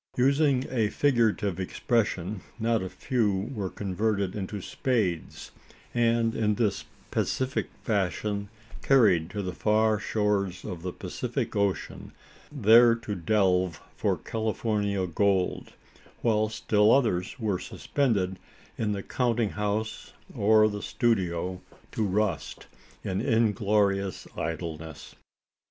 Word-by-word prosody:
Using 135 0 +3
a 115 -5 +1
figurative 110 -8 +1
expression, 100 -1 -1 0.2
not 115 -1 +1
a 95 - -4
few 105 -3 -1
were 100 -6 -3
converted 100 0 -1
into 100 0 -4
spades; 100 - -2 0.4
and 115 -1 +2
in 105 -2 +1
this 105 -3 0 0.3
pacific 130 +1 -1
fashion, 100 0 -1 0.3
carried 100 -12 +4
to 100 0 -4
the 90 -1 -4
far 110 +1 +2
shores 105 -4 -1
of 85 -2 -6
the 90 +1 -4
Pacific - - -4
Ocean 100 -2 -2 0.4
there 115 -3 +6
to 115 -2 -5
delve 95 -2 +1 0.2
for - - 0
Californian 105 -4 -1
gold 95 +1 0 0.5
while 110 -2 +2
still 105 -1 +3
others 110 -5 +1
were 105 -5 -1
suspended 100 -10 -1 0.4
in 105 -2 0
the 100 -1 -4
counting 120 -4 0
house 105 +1 -3 0.2
or 110 +1 +5
the 105 -1 -4
studio, 95 -7 0 0.3
to 110 - -1
rust 105 +2 -1 0.4
in 95 0 -2
inglorious 105 -4 +1
idleness. 80 -1 -5
105 Hz, 110 wpm, -27 LUFS, 95-115 Hz, 0.5 s, there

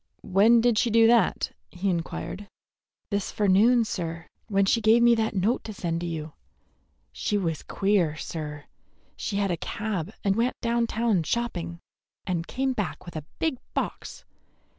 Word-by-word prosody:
"When 220 +5 +5
did 235 -2 +3
she 240 - +2
do 230 0 +5
that?" 230 -3 +3 0.2
he 180 +3 -4
inquired. 185 +3 -3 0.6
"This 200 -1 -1
forenoon, 215 +4 +4
sir, 165 -5 -4 0.2
when 200 -2 +2
she 230 +4 +2
gave 225 +2 +5
me 240 0 +7
that 225 -1 0
note 200 +6 +1
to 215 - -6
send 170 -3 -2
to 175 - -3
you. 160 -2 -5 0.8
She 210 - -1
was 165 -6 -1
queer, 195 -6 +1
sir. 150 -2 -6 0.5
She 205 - -4
had 200 -1 +1
a 170 - -1
cab 200 -2 -3
and 195 -1 +2
went 235 +3 0
down 235 0 +1
town 225 -5 +1
shopping, 170 -3 -3 0.4
and 170 -2 -2
came 265 0 -1
back 175 - -4
with 175 - -10
a 155 - -4
big 315 -6 -1 0.2
box. - - -4
200 Hz, 160 wpm, -26 LUFS, 170-230 Hz, 0.8 s, me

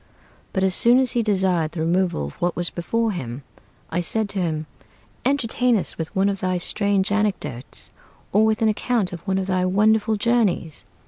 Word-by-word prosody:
But 190 - -1
as 190 -1 +2
soon 235 +6 +4
as 260 -2 +2
he 240 - +1
desired 185 -7 +1
the 165 - -4
removal 170 - 0
of 70 - -7
what 175 0 0
was 175 -1 -1
before 225 +6 -1
him, 130 - -6 0.5
I 170 +2 0
said 215 +4 +1
to 200 - -3
him, 160 -3 -1 0.6
"Entertain 250 -3 +2
us 190 - -2
with 160 -1 -6
one 195 +1 +3
of 200 -1 -1
thy 185 -1 0
strange 200 +2 +2
anecdotes, 190 - -2 0.4
Or 210 +3 +4
with 220 0 +1
an - - +4
account 215 -2 0
of 175 - -5
one 190 0 +1
of 190 - -1
thy 185 -1 0
wonderful 215 +3 +2
journeys." 205 -8 0
190 Hz, 190 wpm, -22 LUFS, 175-220 Hz, 0.6 s, soon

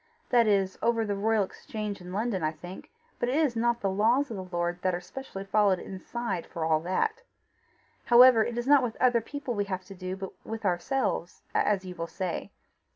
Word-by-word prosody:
That 240 -2 +5
is 195 -2 +1
over 230 -1 +2
the 205 - -1
Royal 215 +1 +2
Exchange 210 +1 -6
in 180 0 -9
London, 210 -1 -1
I 155 0 0
think; 175 +4 -10 0.3
but 240 - 0
it 260 - 0
is 300 -6 +2
not 235 +1 +1
the 195 - +1
laws 235 +8 +2
of 220 - -4
the 190 - -4
Lord 175 +1 -1
that 185 -1 +1
are - - -3
specially 195 +1 -8
followed 200 -1 +3
inside 190 0 -5
for 165 -3 -4
all 160 -1 +3
that. 190 - -1 0.8
However, 240 -1 +8
it 240 +1 -4
is 240 - -1
not 285 0 +6
with 240 -3 -3
other 245 -2 +4
people 270 +2 -5
we 205 -2 -1
have 185 -2 -4
to 195 - -10
do, 185 0 -5
but 190 0 -6
with 225 -1 -6
ourselves 180 0 -1
as 200 -2 +1
you 180 - -6
will 170 -2 -5
say. 185 0 -4
205 Hz, 210 wpm, -28 LUFS, 185-235 Hz, 0.8 s, However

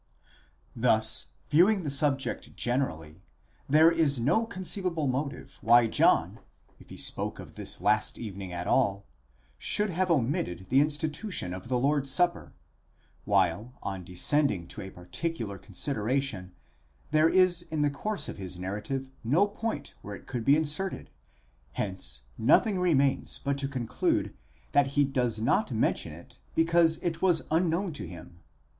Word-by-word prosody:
Thus, 110 - +3 0.2
viewing 185 +6 +4
the 145 - -2
subject 140 -1 +1
generally, 90 - -2 0.5
there 155 +3 +6
is 160 -5 +2
no 145 - +2
conceivable 185 -5 -2
motive 140 +2 -3
why 120 +1 +6
John, 110 - +2 0.4
if - - -17
he - - -10
spoke - - -2
of - - -11
this - - -4
last 110 0 +2
evening 100 -5 -7
at 90 0 -4
all, 100 -7 +1 0.5
should 210 -1 0
have 185 +2 0
omitted 125 - -1
the 130 - +4
insti 150 +1 0
tution 150 - -4
of 95 +4 -9
the 125 0 0
Lord's 140 +2 +1
supper; 175 +5 0 0.7
while, 105 +9 +1
on 95 -2 -4
descending 90 - +1
to - - -7
a 95 - -7
particular 100 - -5
consider 105 +4 -3
ation, 120 -9 -1 0.6
there 155 +1 +4
is 185 -1 +4
in 155 -3 -2
the 145 - +2
course 205 +9 -3
of - - -7
his 95 -2 -6
narrative 105 +9 -4
no 150 - +3
point 225 +2 -5
where 100 0 -7
it - - -14
could 120 -3 -4
be 140 +5 +5
inserted: 160 +5 -2 0.6
hence 65 -11 -3 0.2
nothing 195 - +4
remains 140 -7 +1
but 140 0 -2
to 140 - -1
conclude 125 -5 -1 0.4
that 145 -1 +4
he 145 - +6
does 125 -5 0
not 110 - +1
mention - - 0
it - - -14 0.2
because 165 0 +4
it 170 -2 -2
was 175 -4 +3
unknown 170 +2 +1
to 105 -10 -5
him. 85 0 -12
135 Hz, 150 wpm, -28 LUFS, 105-165 Hz, 0.7 s, there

